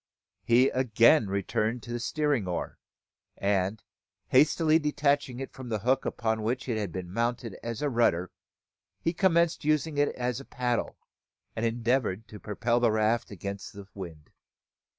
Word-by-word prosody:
He 125 +3 +4
again 120 0 +4
returned 105 +4 -1
to 120 - -8
the 120 - -2
steering 145 -4 0
oar; 90 - -4 0.6
and, 100 +1 0 0.5
hastily 155 +4 +4
detaching 145 -4 0
it 135 - -6
from 130 -2 -8
the 110 - 0
hook 125 +6 +1
upon 110 -1 -1
which 125 +5 -2
it 120 - 0
had 100 -4 -3
been 90 +1 -6
mounted 115 -1 -1
as 115 +3 -4
a 145 - +2
rudder, 90 -7 +2 0.7
he 165 - -1
commenced 170 -3 +2
using 155 0 +1
it 145 - +3
as 125 0 -2
a 140 - -10
paddle, 125 -2 -2 0.6
and 115 +1 0
endeavoured 115 -2 0
to 105 - -10
propel 115 +3 0
the 120 -1 +3
raft 110 +1 +1
against 100 0 -6
the 100 -1 -10
wind. 85 -6 -9
120 Hz, 155 wpm, -28 LUFS, 105-135 Hz, 0.7 s, He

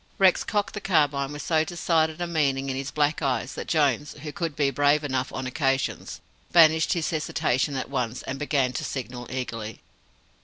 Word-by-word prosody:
Rex 190 -2 +4
cocked 205 -1 -1
the 210 - -5
carbine 145 -7 +1
with 145 -1 -6
so 160 0 +2
decided 160 -1 0
a - - +1
meaning 140 -5 0
in - - -3
his 135 +1 -3
black 150 +1 0
eyes 135 -1 -1
that - - -6
Jones 150 -2 +1
who 150 - -5
could 165 -1 -3
be 140 -2 +2
brave 145 +3 +3
enough 130 -3 -1
on 130 - -4
occasions 135 0 -1 0.3
banished 160 -2 +5
his 170 -3 -1
hesitation 145 -3 0
at 130 - -3
once, 125 -3 -3
and 135 +1 -5
began 140 -4 +1
to - - -3
signal 125 -2 -5
eagerly. 115 -4 -5
145 Hz, 185 wpm, -26 LUFS, 130-160 Hz, 0.3 s, banished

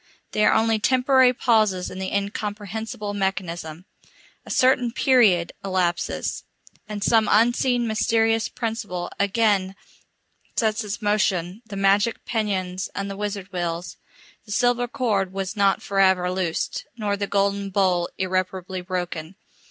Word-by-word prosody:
They 215 - +1
are - - +5
only 225 0 +2
temporary 255 +2 +4
pauses 215 -7 +1
in 185 - -7
the 190 0 -3
incomprehensible 205 +1 -4
mechanism. 180 -4 -3 0.6
A - - -14
certain 255 -2 +3
period 225 -10 +3
elapses, 185 -3 -1 0.5
and 205 -1 -4
some 220 -1 +3
unseen 240 +2 +3
mysterious 225 0 +1
principle 205 -6 -4
again 200 -2 +1 0.8
sets 220 0 +1
in 210 - -8
motion 200 -2 0
the 205 - -7
magic 200 +3 +2
pinions 190 -5 -2
and 200 0 -3
the - - -5
wizard 200 -1 -5
wheels. 170 -1 -3 0.5
The - - -9
silver 245 +1 +2
cord 205 -7 -1
was 195 +1 -3
not 200 -2 +2
for 195 -1 -2
ever 185 -2 +4
loosed, 180 -3 -2
nor 205 -2 -1
the 200 0 -3
golden 200 0 0
bowl 185 -3 +1
irreparably 185 0 -2
broken. 180 -2 -4
200 Hz, 130 wpm, -23 LUFS, 185-220 Hz, 0.8 s, are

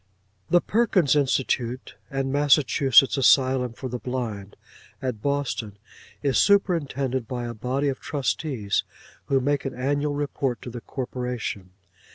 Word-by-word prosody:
The 175 0 +5
Perkins 200 - +2
Institution 130 -3 +1 0.3
and 135 0 -2
Massachusetts 140 -2 +4
Asylum 130 -2 +3
for 130 - -6
the 125 0 -5
Blind, 115 -6 -5 0.4
at 125 -5 -4
Boston, 140 -7 -2 0.5
is 140 -2 +2
superintended 140 - +1
by 120 0 -4
a 120 - -4
body 130 +6 -1
of 135 -2 -2
trustees 135 -6 -1 0.4
who 135 - +2
make 140 +1 0
an 135 -2 -4
annual 145 +3 -1
report 140 -3 -2
to 125 - -7
the 120 0 -7
corporation. 125 -7 -4
130 Hz, 130 wpm, -25 LUFS, 125-145 Hz, 0.5 s, The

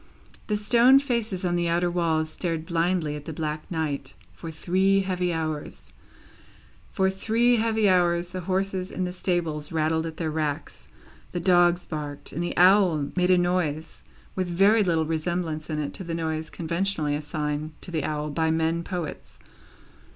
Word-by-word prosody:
The 210 - 0
stone 235 +5 +5
faces 235 -9 -1
on 175 -1 +1
the 175 0 0
outer 175 +1 +1
walls 160 -2 0
stared 165 -3 -3
blindly 170 -3 0
at 150 -1 -8
the 160 - -5
black 155 0 -4
night 145 -5 -3 0.2
for 165 - -8
three 190 +5 +2
heavy 180 -2 -1
hours; 155 - -5 1.0
for 190 0 +1
three 230 +5 +2
heavy 220 -1 +2
hours, 175 -1 +2
the 185 0 -4
horses 190 0 -1
in 185 - -3
the 180 - -4
stables 165 -5 -2
rattled 160 0 0
at 160 -1 -8
their 160 -2 -2
racks, 150 -2 -3 0.5
the 175 - -1
dogs 175 -1 +3
barked, 145 -2 -5
and 165 - -4
the 175 - -3
owl 180 -6 +4
made 180 0 +2
a 185 - +6
noise 175 - -1 0.3
with 185 -1 -1
very 200 +5 +4
little 165 -4 +1
resemblance 160 0 -2
in 155 - -2
it 150 -1 -3
to - - -7
the 165 -2 -4
noise 160 -1 -3
conventionally 170 -3 -1
assigned 150 0 -4
to 180 - -4
the 160 -4 -1
owl 150 0 -2
by 160 +2 0
men 165 +1 0
poets. 175 -4 -6
170 Hz, 165 wpm, -25 LUFS, 155-185 Hz, 1.0 s, a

